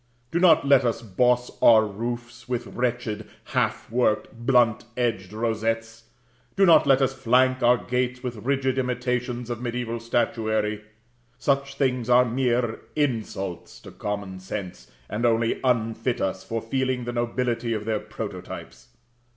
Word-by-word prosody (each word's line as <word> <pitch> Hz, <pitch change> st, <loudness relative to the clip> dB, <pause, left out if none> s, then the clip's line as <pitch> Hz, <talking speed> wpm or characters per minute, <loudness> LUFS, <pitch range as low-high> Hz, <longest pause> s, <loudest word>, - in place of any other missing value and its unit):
Do 170 Hz, -, +1 dB
not 165 Hz, -4 st, +5 dB
let 140 Hz, -2 st, +6 dB
us 115 Hz, -1 st, -1 dB
boss 125 Hz, +4 st, +1 dB
our 110 Hz, -2 st, +7 dB
roofs 120 Hz, +3 st, -6 dB
with 125 Hz, -1 st, -2 dB
wretched, 120 Hz, -3 st, -2 dB
half -, -, -1 dB
worked, 110 Hz, -2 st, +1 dB
blunt 120 Hz, -4 st, +4 dB
edged 115 Hz, -6 st, -1 dB
rosettes; 115 Hz, +1 st, -2 dB, 0.5 s
do 195 Hz, -1 st, +5 dB
not 165 Hz, -4 st, +6 dB
let 135 Hz, 0 st, +5 dB
us 135 Hz, 0 st, +1 dB
flank 130 Hz, 0 st, +2 dB
our 120 Hz, +1 st, +5 dB
gates 125 Hz, 0 st, -2 dB
with 125 Hz, -2 st, -4 dB
rigid 130 Hz, +3 st, 0 dB
imitations 125 Hz, -1 st, -2 dB
of 120 Hz, -, -3 dB
mediæval 120 Hz, -1 st, -3 dB
statuary. 110 Hz, -2 st, 0 dB, 0.5 s
Such 140 Hz, +1 st, 0 dB
things 125 Hz, -3 st, 0 dB
are 125 Hz, +1 st, +6 dB
mere 120 Hz, -1 st, 0 dB, 0.2 s
insults 110 Hz, -, -2 dB
to -, -, -11 dB
common 100 Hz, -2 st, -5 dB
sense, 95 Hz, 0 st, -7 dB, 0.2 s
and 105 Hz, +4 st, -3 dB
only 115 Hz, -1 st, +2 dB
unfit 115 Hz, -1 st, 0 dB
us 95 Hz, 0 st, -2 dB
for 115 Hz, -1 st, -4 dB
feeling 130 Hz, +1 st, -1 dB
the 120 Hz, 0 st, -4 dB
nobility 120 Hz, 0 st, -1 dB
of 105 Hz, -1 st, -3 dB
their 110 Hz, -1 st, 0 dB
prototypes. 105 Hz, -3 st, -8 dB
120 Hz, 145 wpm, -25 LUFS, 110-125 Hz, 0.5 s, our